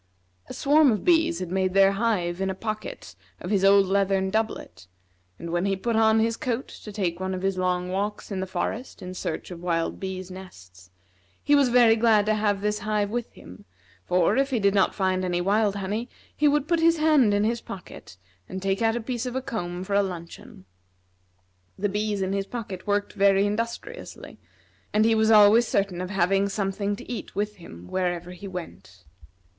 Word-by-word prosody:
A - - -6
swarm 290 -1 +4
of 210 - -2
bees 335 -1 +3
had 180 -1 -5
made 190 0 0
their 195 0 +6
hive 195 -4 -1
in 195 - 0
a 190 - -3
pocket 215 +1 -6 0.2
of 180 - -6
his 195 -2 +2
old 195 0 +6
leathern 195 0 +1
doublet; 215 - -3 0.5
and 170 - -7
when 175 +2 0
he 195 - +1
put 230 +4 -2
on 220 0 +4
this 225 +1 +1
coat 245 +1 -3
to 210 - -10
take 185 -4 -2
one 190 0 -2
of 185 - -6
his 195 0 0
long 180 -1 -1
walks 205 +3 -3
in 195 - -2
the 190 - -3
forest 225 +6 -4
in 185 0 -6
search 185 - -5
of 170 -1 -8
wild 165 -2 -1
bees' 185 -1 -5
nests, 95 - -13 0.5
he 290 - +2
was 280 -3 +5
very 240 -2 +5
glad 220 -2 +3
to 215 - +2
have 210 -2 0
this 210 0 -1
hive 210 -1 -1
with 240 0 -3
him, 90 +2 -14 0.4
for, 180 - +2
if 275 0 +2
he 255 -4 0
did 200 -1 +2
not 195 -2 +2
find 185 -1 0
any 175 -1 -1
wild 205 +2 +1
honey, 205 +5 -3 0.3
he 300 - +3
would 295 0 +2
put 335 0 +2
his 330 0 +4
hand 305 -8 +4
in 205 0 +2
his 230 +2 0
pocket 180 - -10 0.3
and 190 - -5
take 195 +1 -1
out 225 0 +2
a 240 - -2
piece 245 +1 -3
of 250 - -5
a - - +1
comb 180 -7 -4
for 200 - -5
a 200 - +4
luncheon. 170 - -8 1.1
The 205 +1 -1
bees 205 0 -1
in 190 +1 -2
his 195 0 -2
pocket 210 -6 -7
worked 205 0 0
very 200 -1 +3
industriously, 230 - -5 0.5
and 215 +1 +3
he 225 - +4
was 220 0 +2
always 220 +2 +6
certain 195 -3 -1
of 185 - -4
having 195 +1 +1
something 200 0 -2
to - - -12
eat 245 - -6
with 210 +1 -2
him 90 - -12
wherever 175 - -2
he 180 +2 -9
went. 95 - -9
200 Hz, 205 wpm, -25 LUFS, 185-225 Hz, 1.1 s, their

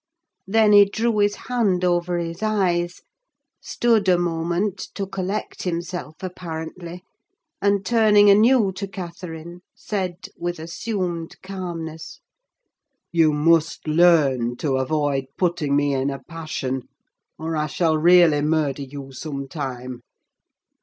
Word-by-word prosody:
Then 215 +1 +4
he 205 -1 +8
drew 220 +2 -1
his 205 0 +2
hand 205 -8 0
over 175 0 +1
his 170 +1 -4
eyes, 180 -5 0 0.6
stood 225 -5 +1
a 180 - +5
moment 175 +3 -1 0.2
to 200 - -2
collect 195 +2 -4
himself 175 -2 -4
apparently, 175 0 -7 0.6
and 200 -1 +1
turning 210 -2 +5
anew 215 +1 +5
to 200 - -3
Catherine, 175 -2 -8
said, 185 -3 -4
with 175 0 -4
assumed 170 0 -4
calmness—"You 170 - -5
must 160 +2 +2
learn 150 -7 +3
to 135 +1 -1
avoid 140 0 0
putting 170 -6 0
me 145 0 +2
in 135 +1 0
a 135 - -4
passion, 155 -6 -5 0.5
or 160 +1 -3
I 150 0 0
shall 160 +1 +1
really 165 -2 +5
murder 150 -2 0
you 135 0 -8
some 140 0 -6
time! 130 -3 -6
170 Hz, 120 wpm, -22 LUFS, 155-190 Hz, 0.6 s, he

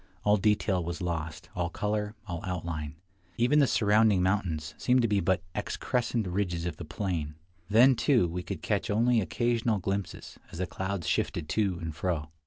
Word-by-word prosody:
All 105 0 +4
detail 100 -3 +1
was 85 +1 -4
lost 80 -2 -4
— - - -28
all 85 -2 -1
color, 105 +2 -2
all 85 -2 -5
outline; 80 -4 -4 0.4
even 125 +6 +4
the 140 - +5
surrounding 105 -3 +4
mountains 85 -5 -1
seemed 125 +6 +2
to - - +3
be 105 -2 +2
but 90 -1 +1
excrescent 120 -2 -1
ridges 90 -2 -1
of 85 - -3
the 85 - -7
plain. 75 -1 -3 0.3
Then, 120 +6 +7
too, 120 - +3
we 90 +2 -4
could - - -6
catch - - -1
only 115 +2 +3
occasional 115 +4 0
glimpses, 95 0 -4
as - - -8
the 90 - -1
clouds 95 -1 -4
shifted 80 -3 -1
to 100 -3 +1
and 80 -2 -5
fro. 80 -1 -2
95 Hz, 180 wpm, -29 LUFS, 85-110 Hz, 0.4 s, Then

